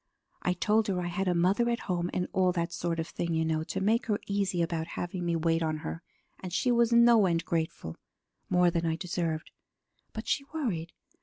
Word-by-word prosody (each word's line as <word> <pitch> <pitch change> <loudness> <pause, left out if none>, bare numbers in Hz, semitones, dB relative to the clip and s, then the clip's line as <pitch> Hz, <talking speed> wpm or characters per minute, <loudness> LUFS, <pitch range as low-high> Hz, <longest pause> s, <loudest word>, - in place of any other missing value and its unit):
I 180 - +1
told 210 +4 +2
her 190 -3 0
I 175 -1 -2
had 190 +2 -2
a 180 - +2
mother 195 +8 +3
at 235 -1 -1
home 175 -2 -1
and 180 - -1
all 185 -1 +3
that 170 -1 -2
sort 170 -2 -2
of 160 - -2
thing, 170 -1 -2
you 160 0 +1
know, 160 -1 0
to - - -3
make 225 +5 +1
her 210 -2 +1
easy 195 -3 0
about 165 -1 -2
having 175 0 -3
me 170 -1 0
wait 165 0 +1
on 155 -1 0
her, 80 +1 -4 0.4
and 185 - -7
she 245 +8 +1
was 235 -1 +3
no 235 -3 +6
end 165 -1 0
grateful 160 - -3 0.5
more 180 -1 +4
than 170 -1 -1
I 165 -1 +1
deserved. 170 -2 -3 0.6
But - - -7
she 280 - +1
worried. 180 - -2
175 Hz, 215 wpm, -29 LUFS, 165-200 Hz, 0.6 s, no